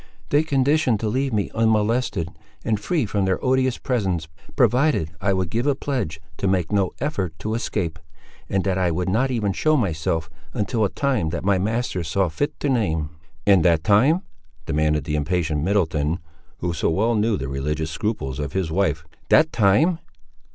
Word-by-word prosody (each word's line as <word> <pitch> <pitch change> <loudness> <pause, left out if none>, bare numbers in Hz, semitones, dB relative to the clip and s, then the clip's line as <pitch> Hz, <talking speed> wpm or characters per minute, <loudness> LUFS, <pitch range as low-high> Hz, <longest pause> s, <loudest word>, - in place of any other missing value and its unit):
"They 145 - +4
conditioned 140 -5 +2
to 110 - -1
leave 130 +5 0
me 105 -3 -1
unmolested, 110 -5 +1 0.4
and 110 -2 +1
free 150 +5 0
from 100 -1 0
their 95 -1 +1
odious 130 -1 +2
presence, 95 - -1 0.3
provided 125 - +2
I 100 0 +2
would 95 -2 -1
give 120 +5 0
a 145 - +3
pledge 125 - -3 0.2
to 100 - -1
make 95 -3 +1
no 100 -3 +1
effort 95 - -2
to 110 +6 -3
escape; 90 -8 -2 0.5
and 95 -1 +1
that 95 -1 0
I 90 -1 +2
would 90 +2 -1
not 120 +8 +2
even 110 -6 0
show 155 +7 +2
myself, 80 - -1 0.3
until 110 0 0
a - - 0
time 130 - 0
that 85 +2 -4
my 100 -2 +3
masters 105 -4 -1
saw 95 +2 +1
fit 145 - -3
to 145 - 0
name." 80 - 0 0.3
"And 95 -4 +5
that 85 -2 +3
time?" 130 - +4 0.4
demanded 75 -1 +1
the 75 - -2
impatient 80 0 0
Middleton, 80 -4 +1 0.4
who 85 -1 -1
so 80 - 0
well 110 +8 +2
knew 110 0 +1
the 65 - -4
religious 75 +4 -2
scruples 80 - -3
of 70 -1 -4
his 95 -4 -1
wife—"that 80 - +1
time?" 130 - +3
100 Hz, 175 wpm, -23 LUFS, 80-120 Hz, 0.5 s, And